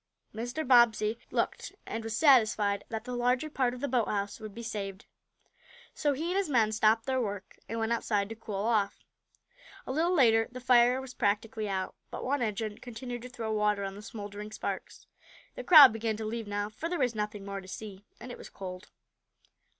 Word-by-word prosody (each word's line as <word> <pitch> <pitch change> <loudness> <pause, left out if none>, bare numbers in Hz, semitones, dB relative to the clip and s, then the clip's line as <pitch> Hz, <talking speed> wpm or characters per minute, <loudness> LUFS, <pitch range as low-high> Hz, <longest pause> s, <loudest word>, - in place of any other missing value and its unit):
Mr. 245 +7 -4
Bobbsey 235 -3 +4
looked, - - -2
and 225 - -4
was 225 0 -3
satisfied 220 -8 +4
that 220 -1 -4
the 250 0 -5
larger 250 +5 +1
part 250 -3 0
of 250 - -10
the 285 - -1
boathouse 210 -5 -1
would 215 -1 -8
be 235 - -7
saved. 200 -4 -5 0.9
So 290 -1 +1
he 320 +5 -3
and 375 - 0
his 395 -5 0
men 225 -6 +3
stopped 220 +1 +3
their 260 -1 0
work; 200 -4 -5
and 230 - -3
went 225 0 -1
outside 205 -3 0
to 225 - -6
cool 215 -2 -7
off. 215 -4 0 0.8
A - - -4
little 325 +6 +1
later 225 -6 +4
the 255 - -7
fire 250 0 +4
was 265 -1 -8
practically 210 0 -1
out, 190 -1 -2 0.2
but - - -6
one 275 +1 0
engine 215 -1 -2
continued 245 0 -7
to 250 - -8
throw 225 -3 -4
water 210 -1 +1
on 195 0 -4
the 205 - -10
smouldering 210 -1 -8
sparks. 215 - -5 0.5
The - - -7
crowd 300 - +10
began 225 -1 -2
to 220 - -5
leave 225 0 -4
now, 205 0 -2
for 315 +10 -5
there 355 - -1
was 250 -5 +1
nothing 210 -2 -4
more 200 0 -5
to 190 - -14
see, 200 0 -8 0.2
and 245 +2 -8
it - - -9
was - - -10
cold. 185 0 -8
225 Hz, 200 wpm, -30 LUFS, 210-250 Hz, 0.9 s, crowd